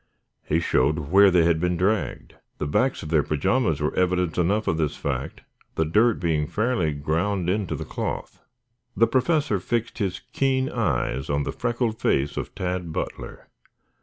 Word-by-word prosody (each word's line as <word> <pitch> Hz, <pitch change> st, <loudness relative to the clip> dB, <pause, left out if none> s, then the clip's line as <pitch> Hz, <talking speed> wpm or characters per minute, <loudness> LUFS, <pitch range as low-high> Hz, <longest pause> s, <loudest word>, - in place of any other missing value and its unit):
He 80 Hz, -, 0 dB
showed 75 Hz, -2 st, +2 dB
where 100 Hz, +1 st, +7 dB
they 90 Hz, -2 st, +4 dB
had 80 Hz, -1 st, +2 dB
been 90 Hz, +1 st, 0 dB
dragged. 100 Hz, +4 st, -1 dB, 0.2 s
The -, -, -3 dB
backs 125 Hz, -, 0 dB
of 75 Hz, -, -6 dB
their 80 Hz, -2 st, +4 dB
pajamas 80 Hz, -, 0 dB
were 75 Hz, 0 st, -1 dB
evidence 90 Hz, -2 st, +1 dB
enough 100 Hz, +5 st, +1 dB
of 80 Hz, -, +1 dB
this 75 Hz, -3 st, -1 dB
fact, -, -, -4 dB, 0.3 s
the 80 Hz, -, +1 dB
dirt 110 Hz, +8 st, +3 dB
being 80 Hz, -4 st, 0 dB
fairly 110 Hz, -5 st, 0 dB
ground 80 Hz, +6 st, -1 dB
into 100 Hz, -1 st, -1 dB
the -, -, -5 dB
cloth. -, -, -5 dB, 0.6 s
The 115 Hz, -, +6 dB
Professor 135 Hz, -, +1 dB
fixed 115 Hz, +4 st, -2 dB
his 95 Hz, -4 st, -2 dB
keen 135 Hz, -1 st, +1 dB
eyes 70 Hz, -, -1 dB
on 70 Hz, 0 st, +1 dB
the -, -, -3 dB
freckled 120 Hz, -2 st, -2 dB
face 70 Hz, +2 st, +1 dB
of -, -, -5 dB
Tad 90 Hz, -2 st, -3 dB
Butler. -, -, -6 dB
90 Hz, 165 wpm, -24 LUFS, 80-110 Hz, 0.6 s, where